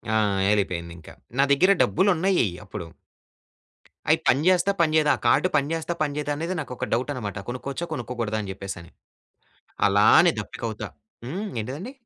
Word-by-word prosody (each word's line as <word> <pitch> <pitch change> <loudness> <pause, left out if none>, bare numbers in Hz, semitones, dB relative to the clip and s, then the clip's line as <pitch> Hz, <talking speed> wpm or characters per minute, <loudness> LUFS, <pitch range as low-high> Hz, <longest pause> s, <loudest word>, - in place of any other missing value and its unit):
ఆ! - - +4 0.3
ఏళ్ళి‌పోయింది 90 -5 -1
ఇంకా. 80 - -13 0.3
నా - - +6
దగ్గర 180 +8 +5
డబ్బులు 190 +3 +2
ఉన్నయి 180 - +2 0.2
అప్పుడు. 100 -3 -7 1.2
అయి - - +5
పనిచేస్తదా? 180 +7 +3
పనిచేయదా? 155 -2 +3
ఆ - - -18
కార్డ్ 120 - +4
పనిచేస్తదా? 160 +4 -2
పనిచేయదా? 145 0 -2
అనేది 170 +4 -3
నాకు 135 -5 -5
ఒక - - -3
డౌట్ 125 +5 0
అనమాట. 105 -6 -5
కొనుక్కోవచ్చా? 135 +6 -4
కొనుక్కోకూడదా? 120 -5 -3
అని 100 -2 -5
చెప్పేసి 95 0 -7
అని, 85 - -16 1.0
అలానే 110 - +6
దప్పిక 105 - -8
అవుతా 110 - -6 0.4
హ్మ్, 190 - -4
ఏంటిదండి? 145 - -6
140 Hz, 150 wpm, -24 LUFS, 105-165 Hz, 1.2 s, నా